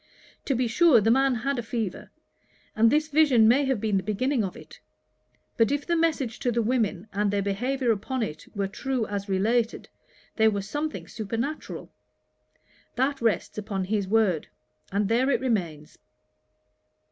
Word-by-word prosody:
To 275 - 0
be 245 0 +1
sure 270 +2 +5
the 220 +2 +2
man 270 +1 +3
had 265 +3 -1
a - - 0
fever; 225 -5 -4 0.7
and 225 +1 +5
this 300 +3 +2
vision 280 -7 +5
may 270 +5 +4
have 265 -4 0
been 210 -2 0
the - - 0
beginning 220 +6 0
of 190 - -5
it. - - -14 0.8
But 225 +1 +3
if 285 0 -1
the 340 - +1
message 300 -8 0
to 245 - 0
the 235 0 0
women, 220 -5 0
and 205 +1 +1
their 200 0 0
behaviour 245 +6 0
upon 230 +4 -2
it, 155 -7 -6
were 200 -1 -1
true 250 +4 -2
as 200 -1 -5
related, 220 +5 0 0.5
there 220 -1 +5
was 200 -2 -3
something 300 +7 -4
supernatural. 230 +8 -5 1.0
That 270 +2 0
rests 215 -2 0
upon 200 -2 -3
his 200 0 -1
word; 200 -6 +2 0.4
and 200 +1 +1
there 240 +5 +2
it - - +2
remains.' 175 - -3
225 Hz, 165 wpm, -26 LUFS, 205-265 Hz, 1.0 s, sure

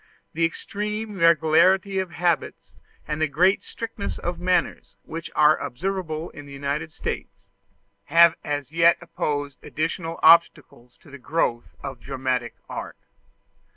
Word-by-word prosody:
The 165 +1 +2
extreme 210 +4 -4
regularity 170 +4 +4
of 190 -1 -2
habits 170 -1 -2 0.3
and 150 +1 -3
the 155 - +3
great 180 +7 +3
strictness 225 -3 -6
of 175 0 -4
manners 180 0 -1
which 165 0 -7
are 155 0 +5
observable 165 +1 -4
in 145 -1 -11
the - - -12
United 145 +3 -3
States, 100 -9 -6 0.6
have 170 0 +6
as 145 -2 -3
yet 165 +1 +5
opposed 145 -4 -4
additional 165 +1 -3
obstacles 160 -7 +4
to - - -16
the 140 - -10
growth 125 -4 -2
of 135 -3 -6
dramatic 130 -2 -3
art. - - -7
160 Hz, 130 wpm, -24 LUFS, 145-175 Hz, 0.6 s, have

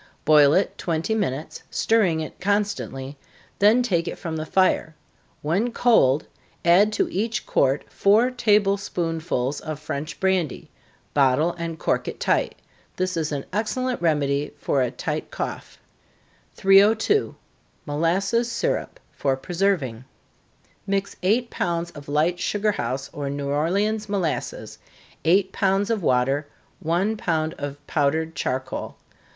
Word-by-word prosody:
Boil 150 -1 +6
it 190 - 0
twenty 165 +5 -1
minutes, 160 -9 -3
stirring 190 -8 +2
it 155 - -7
constantly, 190 -9 -2 0.4
then 220 +5 +5
take 175 -7 0
it - - -4
from 165 -3 -5
the 155 0 -4
fire 185 -4 +2 0.5
when 195 +11 0
cold, 165 - +3 0.4
add 190 +5 +5
to - - +1
each 220 +3 -2
quart 135 +1 +2
four 220 +6 +3
table 210 -5 +3
spoonsful 165 -8 -2
of 155 -2 -5
French 150 0 -5
brandy 190 -6 -1 0.4
bottle 145 +4 +3
and 165 -1 -4
cork - - -1
it - - -5
tight. - - +1 0.4
This 185 0 -1
is 160 -2 -1
an 140 -2 -3
excellent 245 +4 -1
remedy 145 -3 0
for 140 -1 0
a 125 - +1
tight - - -4
cough. - - -6 0.8
302. 210 - +4 0.5
Molasses 190 +10 0
Syrup, 365 - -2
for 135 -2 -1
preserving. 165 - -1 0.8
Mix 200 0 -1
eight 225 +6 +1
pounds 170 0 -2
of 145 -1 -11
light 160 +4 +1
sugar 210 +1 0
house 135 -8 -3
or 140 -1 -4
New 140 0 -3
Orleans 200 +9 0
molasses, 190 -6 -3 0.5
eight 190 +3 +3
pounds 195 +2 +1
of 220 -3 0
water, 135 +1 +1 0.3
one 180 +7 0
pound 160 -5 -1
of 145 0 -5
powdered 160 +3 0
charcoal. 130 -2 -3
170 Hz, 130 wpm, -24 LUFS, 145-200 Hz, 0.8 s, Boil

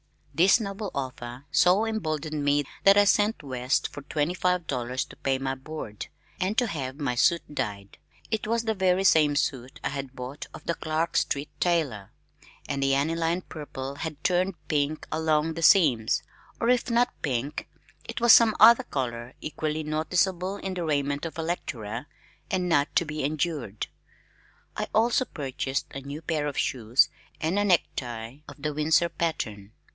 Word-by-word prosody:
This 180 - +5
noble 200 -1 -4
offer 130 -1 -5
so 185 +5 +4
emboldened 155 -8 -2
me 145 0 +3 0.2
that 195 +1 +8
I 205 - +7
sent 205 -2 +2
west 130 -1 0
for 145 - -9
twenty 150 +3 -1
five 180 -1 0
dollars 125 -2 -2
to - - -14
pay 135 -1 0
my 135 0 -2
board, 135 -6 -7 0.3
and 195 +4 -1
to 245 - +4
have 135 - -4
my 135 -4 0
suit 170 +8 +3
dyed. 100 -7 -4 0.3
It 215 -1 -1
was 230 +1 +1
the 220 -1 0
very 190 -1 +2
same 155 -6 +5
suit 130 -2 -2
I - - 0
had 135 -1 -6
bought 130 +3 -7
of - - -11
the 170 - -1
Clark 160 0 -1
Street 140 +1 -1
tailor, 145 - 0 0.6
and 140 -1 -2
the 135 0 +3
aniline 165 +4 0
purple 140 -3 -7
had 150 0 -6
turned 185 +1 +1
pink 150 +1 0
along 160 0 +1
the 165 - -5
seams 150 - +4 0.4
or 230 - +1
if 250 -1 +2
not 240 +1 +2
pink 135 +1 -2 0.4
it - - -4
was 235 -1 +7
some 225 -2 +6
other 235 +3 +8
color 120 - -4
equally 155 0 -3
noticeable 180 +5 0
in 190 -1 -4
the 180 -2 -3
raiment 145 -1 0
of 165 - -10
a 165 - -2
lecturer, 125 -7 -4 0.4
and 180 -1 0
not 145 -3 +2
to 170 - +3
be 155 -1 -4
endured. 145 - -2 0.9
I - - -2
also 235 +4 +3
purchased 135 - -3
a 135 - -6
new 140 +4 -7
pair 150 -1 -1
of 145 - -4
shoes 120 0 +3 0.3
and 165 +5 0
a - - +2
necktie 125 - -1
of - - -11
the 150 -1 -1
Windsor 155 +3 +3
pattern. 110 -13 -3
155 Hz, 170 wpm, -27 LUFS, 135-180 Hz, 0.9 s, that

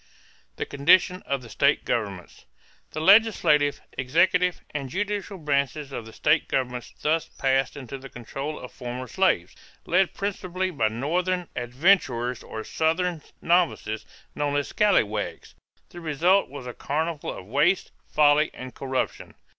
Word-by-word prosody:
=The - - -3
Condition 175 +6 +3
of 140 -2 -1
the 120 - -11
State 140 +4 +2
Governments.= 100 -6 -3 0.4
The 155 - -5
legislative, 170 -7 +4
executive, 175 +7 +2
and 140 -3 -4
judicial 205 +3 -3
branches 140 -2 -1
of 115 -4 -6
the - - -10
state 150 +6 +2
governments 125 -2 -2
thus 160 +1 +1
passed 135 +1 0
into 135 0 -7
the 135 +1 -10
control 135 +5 -6
of 125 - -9
former 125 0 -6
slaves, 120 - +1 0.3
led 185 +2 +2
principally 185 -2 -2
by 140 -9 +1
Northern 175 +10 -1
adventurers 125 - +1
or 110 - -7
Southern 165 +1 0 0.2
novices, 170 -11 +1 0.3
known 145 -1 -1
as 145 0 0
"Scalawags." 110 - +1 0.4
The 175 - -10
result 170 +4 +2
was 140 -2 -8
a 125 - -6
carnival 155 +3 -2
of - - -9
waste, 145 - +2 0.2
folly, 150 0 +4
and 130 0 -8
corruption. 130 -1 -3
145 Hz, 140 wpm, -25 LUFS, 130-175 Hz, 0.4 s, legislative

